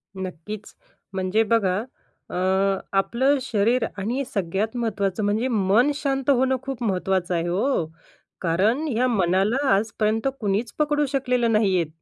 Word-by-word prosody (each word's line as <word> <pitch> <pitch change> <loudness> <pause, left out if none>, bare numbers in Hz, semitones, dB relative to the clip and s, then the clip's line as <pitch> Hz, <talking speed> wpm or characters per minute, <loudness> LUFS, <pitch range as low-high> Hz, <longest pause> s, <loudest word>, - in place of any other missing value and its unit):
नक्कीच. 190 +3 -7 0.4
म्हणजे 190 +4 +1
बघा. 190 -4 +2 0.5
अ, - - -6 0.6
आपलं 265 +7 +2
शरीर 235 0 +1
आणि 235 +8 -2
सगळ्यात 200 +4 -1
महत्त्वाचं 205 -3 -1
म्हणजे 215 +5 +1
मन 225 +3 +3
शांत 275 -2 -1
होणं 260 -1 +3
खूप 265 -3 -5
महत्त्वाचं 185 -3 0
आहे 170 0 -1
हो. 185 - +1 0.6
कारण 200 - +1
ह्या 250 -1 +1
मनाला 195 +1 +2 0.2
आजपर्यंत 220 +3 0
कुणीच 210 +2 -1
पकडू 295 0 +2
शकलेलं 250 -3 +1
नाहीयेत. 190 -7 +2
215 Hz, 125 wpm, -24 LUFS, 190-250 Hz, 0.6 s, मन